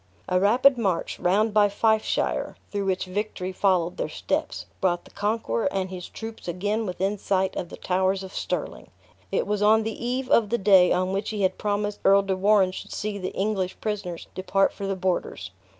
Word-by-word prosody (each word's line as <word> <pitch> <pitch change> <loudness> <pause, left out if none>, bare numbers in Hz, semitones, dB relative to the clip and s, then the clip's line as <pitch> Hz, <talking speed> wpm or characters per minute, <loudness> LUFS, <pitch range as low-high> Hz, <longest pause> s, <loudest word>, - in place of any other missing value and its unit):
A 180 - +2
rapid 245 +6 +4
march, 190 -7 -1
round 205 +4 +2
by 210 -1 +5
Fifeshire 220 +2 0 0.2
(through 200 -1 -2
which 190 -1 0
victory 185 -1 -3
followed 180 -2 +1
their - - -2
steps), - - -3 0.2
brought 175 -2 +1
the - - -16
conqueror 205 - -1
and 190 -1 -2
his 180 -1 -7
troops 225 -3 -8
again 205 +5 -1
within 190 +3 -2
sight 190 -1 0
of 175 - -4
the - - -9
towers 190 +1 0
of 190 - -9
Stirling. - - -4 0.4
It - - +1
was 210 0 -1
on 220 +1 +5
the 225 +1 -5
eve 255 +2 -1
of 220 -4 +3
the 235 - +1
day 190 -3 +5
on 185 +1 +1
which 200 +2 -2
he 210 -2 -2
had 185 0 +1
promised 205 0 -1
Earl 195 +1 +5
de 195 -1 -1
Warenne 195 0 +3
should - - -8
see 205 -1 -3
the 185 - -4
English 195 -2 -1
prisoners 200 -6 -4
depart 195 +1 +1
for 200 - -5
the 195 - -1
borders. 180 - -2
195 Hz, 195 wpm, -25 LUFS, 185-210 Hz, 0.4 s, by